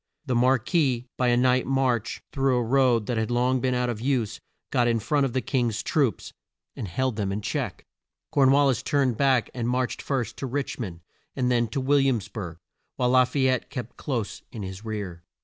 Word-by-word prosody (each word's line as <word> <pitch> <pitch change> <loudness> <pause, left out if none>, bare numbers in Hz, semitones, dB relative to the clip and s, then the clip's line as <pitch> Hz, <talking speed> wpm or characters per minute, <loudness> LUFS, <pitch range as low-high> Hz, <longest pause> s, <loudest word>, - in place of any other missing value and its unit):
The 130 - -1
Mar 125 +2 +4
quis, 130 -1 +1
by 125 - +1
a 120 0 +4
night 125 0 +3
march 130 -4 0
through 135 -2 +2
a 120 - +1
road 120 -2 +3
that 120 0 -2
had 110 - -1
long 125 +2 +2
been 130 -1 +1
out 125 0 +1
of 115 -3 -3
use, 125 -5 0 0.3
got 120 -1 +3
in 115 -1 +2
front 140 +5 +1
of 120 - -7
the 130 - +1
King's 120 -6 -1
troops, 135 - 0 0.4
and 105 - -5
held 125 +6 -1
them 100 -2 -1
in 100 +1 -3
check. 110 - -3 0.5
Corn 140 -4 +4
wal 140 +1 +5
lis 130 -3 +2
turned 135 -3 +1
back, 130 -1 +2
and 120 -2 -2
marched 125 0 -1
first 120 -5 -2
to 135 - -4
Rich 140 +2 -3
mond, 90 -8 -5 0.3
and 125 -1 +1
then 120 -1 +2
to 110 +5 -3
Will 140 +2 +3
iams 120 -7 +1
burg, 90 -5 -6 0.4
while 125 0 +1
La 130 0 +6
fay 130 +1 +1
ette 130 -2 0
kept 125 -3 -6
close 120 -8 -3
in 110 -5 -6
his 95 +1 -7
rear. 100 -6 -5
125 Hz, 215 wpm, -26 LUFS, 115-130 Hz, 0.5 s, La